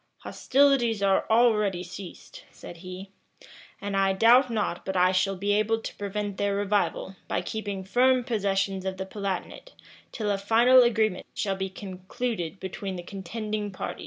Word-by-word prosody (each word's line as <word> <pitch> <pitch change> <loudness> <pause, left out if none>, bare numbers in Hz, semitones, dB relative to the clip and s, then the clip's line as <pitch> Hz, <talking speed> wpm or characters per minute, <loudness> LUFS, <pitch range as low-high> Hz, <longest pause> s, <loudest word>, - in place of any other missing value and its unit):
"Hostilities 255 -6 +2
are 195 -1 +2
already 210 -5 +3
ceased," 180 0 -10
said 175 - -11
he, 185 +2 -9 0.7
"and 200 0 -4
I 195 0 +3
doubt 240 +6 +5
not 210 -6 -2
but 190 -1 -3
I 180 +1 +4
shall 190 +1 +1
be 200 +2 0
able 215 +2 +2
to - - -7
prevent 205 0 -4
their 200 0 0
revival, 200 -1 -1
by - - -1
keeping 205 -3 -5
firm 250 +5 +3
possession 195 -5 -1
of 190 0 -3
the 190 - -4
Palatinate, 200 - -5 0.4
till 210 -3 -2
a 200 - -1
final 235 +5 +5
agreement 220 -5 +1
shall 195 -2 -1
be 190 0 -3
concluded 190 0 -5
between 190 +1 -5
the 175 - -6
contending 210 +3 -4
parties." 185 - -6
200 Hz, 160 wpm, -26 LUFS, 190-225 Hz, 0.7 s, doubt